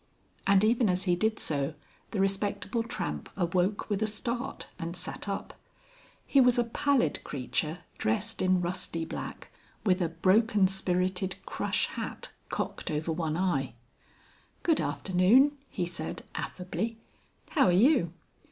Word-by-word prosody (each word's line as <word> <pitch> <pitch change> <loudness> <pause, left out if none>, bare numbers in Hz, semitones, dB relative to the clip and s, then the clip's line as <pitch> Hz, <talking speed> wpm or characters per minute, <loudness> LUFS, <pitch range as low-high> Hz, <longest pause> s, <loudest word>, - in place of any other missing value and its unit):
And 195 0 +5
even 230 0 +3
as 180 0 +1
he 180 -2 +3
did 220 +4 +1
so 145 0 -1 0.3
the 210 - -3
Respectable 195 +4 0
Tramp 75 - -4
awoke 185 +2 +1
with 205 -1 -1
a 220 - +2
start 235 +4 -3
and 170 +2 -3
sat 200 - -3
up. 195 - -4 0.7
He 275 - +5
was 250 -1 +5
a 240 - +4
pallid 255 +3 +1
creature, 150 +5 -2 0.2
dressed 110 +1 0
in 185 -1 +3
rusty 175 -2 -1
black, - - -7 0.3
with 185 -2 +3
a 170 - +1
broken 195 +4 +3
spirited 185 0 0
crush - - 0
hat - - -5 0.2
cocked - - -3
over 155 +2 -1
one 160 -1 -1
eye. 140 -10 0 0.9
"Good 325 -3 +3
afternoon," 210 +11 +4
he 180 - -2
said 175 +1 -5
affably. 220 +5 -3 0.5
"How 285 - +4
are - - +5
you?" 195 - +4
185 Hz, 140 wpm, -29 LUFS, 175-220 Hz, 0.9 s, And